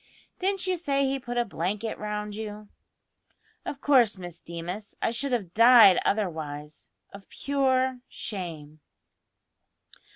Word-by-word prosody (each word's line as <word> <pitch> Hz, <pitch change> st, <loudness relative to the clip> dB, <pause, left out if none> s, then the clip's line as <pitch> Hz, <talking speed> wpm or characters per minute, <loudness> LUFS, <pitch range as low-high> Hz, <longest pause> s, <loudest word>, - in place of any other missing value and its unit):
"Didn't 385 Hz, 0 st, 0 dB
you 370 Hz, -1 st, 0 dB
say 275 Hz, -4 st, 0 dB
he 270 Hz, 0 st, -1 dB
put 245 Hz, -1 st, -5 dB
a 240 Hz, -, +2 dB
blanket 205 Hz, +3 st, -3 dB
round 210 Hz, 0 st, -4 dB
you?" 210 Hz, -1 st, -7 dB, 1.0 s
"Of 275 Hz, -, -5 dB
course, 245 Hz, -8 st, +4 dB
Miss 175 Hz, -2 st, -8 dB
Deemas; 175 Hz, +5 st, -7 dB
I -, -, 0 dB
should 270 Hz, +4 st, -2 dB
have 200 Hz, -8 st, -2 dB
died 230 Hz, -4 st, +8 dB
otherwise 155 Hz, -7 st, -3 dB, 0.2 s
of 200 Hz, -1 st, -12 dB
pure 260 Hz, -2 st, 0 dB
shame." 160 Hz, -7 st, -7 dB
215 Hz, 125 wpm, -27 LUFS, 180-260 Hz, 1.0 s, died